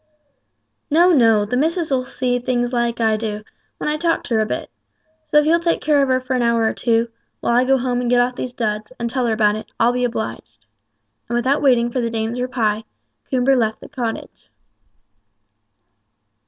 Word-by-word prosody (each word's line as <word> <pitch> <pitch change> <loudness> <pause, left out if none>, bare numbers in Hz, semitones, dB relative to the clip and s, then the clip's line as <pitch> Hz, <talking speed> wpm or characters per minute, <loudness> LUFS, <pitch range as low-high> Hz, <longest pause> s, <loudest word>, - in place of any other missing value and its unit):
"No, 340 +4 +5
no! 225 -8 +4
the 220 - -2
missus'll 300 -2 0
see 250 -1 -1
things 245 0 -1
as 235 -1 0
I 220 -1 +2
do, 210 -1 -4 0.3
when - - -4
I 300 0 0
talk 330 +1 0
to - - -4
her 220 - +3
a 215 - +1
bit. - - -4 0.6
So 300 - +2
if 300 - +5
you'll 330 +2 +4
take 335 0 0
care 295 -2 +2
of 275 - +2
her 260 0 +2
for 255 0 -3
an 250 - +1
hour 235 -1 +2
or 220 - +1
two, 230 0 +1 0.3
while 235 - 0
I 250 +1 +4
go 270 +1 +3
home 245 -1 -1
and 245 - -1
get 245 0 +4
off 245 +1 +1
these 250 - -4
duds, 215 -2 -3
and 235 - -1
tell 255 -1 0
her 225 - +1
about 210 -1 +2
it, 215 - -8
I'll 235 +2 +3
be 250 0 -1
obliged;" 230 -2 -5 0.6
and 240 - -1
without 260 +4 +1
waiting 240 -4 +3
for 255 - -1
the 235 - -1
dame's 225 +2 -3
reply, 225 -4 -1 0.5
Coomber 260 +1 +2
left 220 -3 0
the - - -12
cottage. 235 -3 -6
245 Hz, 205 wpm, -20 LUFS, 230-260 Hz, 0.6 s, No